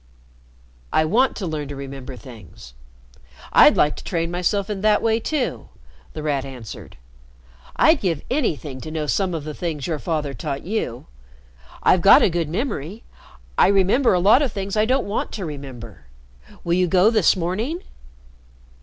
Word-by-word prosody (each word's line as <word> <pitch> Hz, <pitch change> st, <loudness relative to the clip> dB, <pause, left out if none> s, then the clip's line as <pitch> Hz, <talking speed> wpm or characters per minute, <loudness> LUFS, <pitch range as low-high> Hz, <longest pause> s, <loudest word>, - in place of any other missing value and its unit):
"I 155 Hz, -, +3 dB
want 240 Hz, +11 st, +2 dB
to 200 Hz, -, -4 dB
learn 155 Hz, -3 st, -4 dB
to 145 Hz, -, -7 dB
remember 135 Hz, -1 st, -8 dB
things. 105 Hz, -, -13 dB, 0.8 s
I'd -, -, +7 dB
like 150 Hz, -, +3 dB
to -, -, -9 dB
train 165 Hz, -1 st, -2 dB
myself 180 Hz, +3 st, 0 dB
in 205 Hz, -3 st, -4 dB
that 210 Hz, 0 st, +3 dB
way 225 Hz, 0 st, +2 dB
too," 280 Hz, +2 st, -3 dB, 0.4 s
The 155 Hz, -, -6 dB
Rat 145 Hz, -3 st, -1 dB
answered. 125 Hz, -5 st, -10 dB, 0.8 s
"I'd 315 Hz, -1 st, +4 dB
give 170 Hz, -6 st, -1 dB
anything 155 Hz, -, -2 dB
to 155 Hz, -, -7 dB
know 155 Hz, -1 st, -3 dB
some 180 Hz, +3 st, 0 dB
of 155 Hz, -, -4 dB
the 155 Hz, 0 st, -6 dB
things 155 Hz, -4 st, -4 dB
your 160 Hz, -3 st, -2 dB
father 150 Hz, -4 st, -2 dB
taught 140 Hz, -1 st, -5 dB
you. 180 Hz, -, -3 dB, 0.8 s
I've 180 Hz, -, +4 dB
got 195 Hz, -, +7 dB
a -, -, +3 dB
good 165 Hz, -2 st, -1 dB
memory. 200 Hz, -, -4 dB, 0.6 s
I -, -, +6 dB
remember 200 Hz, +5 st, +3 dB
a -, -, +2 dB
lot 210 Hz, +9 st, +5 dB
of 275 Hz, -6 st, 0 dB
things 195 Hz, 0 st, -4 dB
I 215 Hz, 0 st, +3 dB
don't 255 Hz, +3 st, +1 dB
want 200 Hz, -, -3 dB
to 195 Hz, -, -4 dB
remember. 135 Hz, -7 st, -9 dB, 0.6 s
Will 170 Hz, -, 0 dB
you 180 Hz, +1 st, +2 dB
go 185 Hz, +5 st, +4 dB
this 215 Hz, -6 st, +4 dB
morning?" 215 Hz, -, -3 dB
175 Hz, 170 wpm, -22 LUFS, 145-210 Hz, 0.8 s, I'd